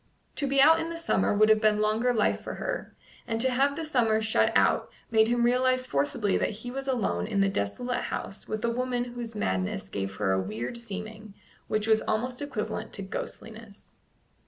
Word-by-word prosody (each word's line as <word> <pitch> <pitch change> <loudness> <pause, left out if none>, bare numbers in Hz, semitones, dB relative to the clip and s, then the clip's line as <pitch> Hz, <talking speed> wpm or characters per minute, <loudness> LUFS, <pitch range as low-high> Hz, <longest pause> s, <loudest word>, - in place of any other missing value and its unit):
To 285 - 0
be 275 0 +2
out 320 +4 +7
in 325 0 -3
the 335 - -5
summer 330 - +1
would 215 +1 +5
have 215 0 +5
been 215 -1 +3
longer 215 +4 +2
life 220 -4 +1
for - - -6
her, - - -4 0.3
and 225 -1 -1
to 260 +2 +3
have 275 +3 +2
the 325 +1 -4
summer 235 -7 +2
shut 220 0 +2
out - - +2 0.2
made 220 -1 +5
him 240 0 +2
realize 255 +1 +2
forcibly 165 - 0
that - - +1 0.2
he 245 - -4
was 270 +1 -5
alone 195 - 0
in 200 - -1
the 195 - +4
desolate 245 - -2
house 195 - -5
with 215 +1 -3
a - - +2
woman 250 0 -1
whose 235 -2 -6
madness 95 - -2
gave 95 0 -4
her 100 -1 0
a 95 0 +2
weird 110 - -4
seeming 215 -2 -8 0.3
which 215 0 0
was 220 -1 +3
almost 245 +4 -2
equivalent 220 -7 -4
to 200 - -5
ghostliness. 215 +2 -8
220 Hz, 200 wpm, -28 LUFS, 205-250 Hz, 0.3 s, out